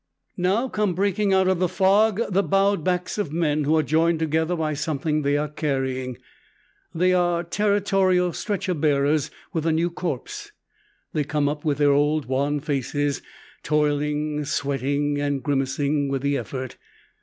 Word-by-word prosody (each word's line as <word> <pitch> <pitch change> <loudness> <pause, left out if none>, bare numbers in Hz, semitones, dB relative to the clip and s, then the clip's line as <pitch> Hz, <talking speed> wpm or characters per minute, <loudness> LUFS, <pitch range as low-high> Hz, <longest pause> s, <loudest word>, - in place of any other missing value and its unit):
Now 195 +8 +1
come 210 -7 -1
breaking 200 +2 +1
out 190 -1 +3
of 185 -2 +2
the 180 -1 +1
fog 200 +3 +3
the 195 +2 +3
bowed 195 -3 +2
backs 180 +3 -1
of 175 -8 -2
men 155 -2 0
who 155 +2 +3
are 155 - +3
joined 160 +3 +2
together 160 +2 0
by 155 -2 -1
something 155 0 -1
they 145 0 +1
are 150 +1 -1
carrying. 130 -4 -2 0.7
They 180 +2 +2
are 175 -1 +1
Territorial 195 -2 +1
stretcher 200 -3 -2
bearers 145 -1 +1 0.2
with 165 -2 -1
a - - +3
new 165 +2 +1
corpse. 410 - -5 0.6
They 150 - +1
come 145 0 0
up 150 +1 -3
with 145 -3 0
their 145 -1 +4
old 150 +1 +2
wan 140 +3 0
faces, 145 0 -1 0.4
toiling, 150 0 0
sweating, 145 0 -1
and 145 -2 -1
grimacing 140 +1 0
with 135 -1 -2
the 140 0 +1
effort. 130 -2 -5
155 Hz, 155 wpm, -24 LUFS, 145-180 Hz, 0.7 s, their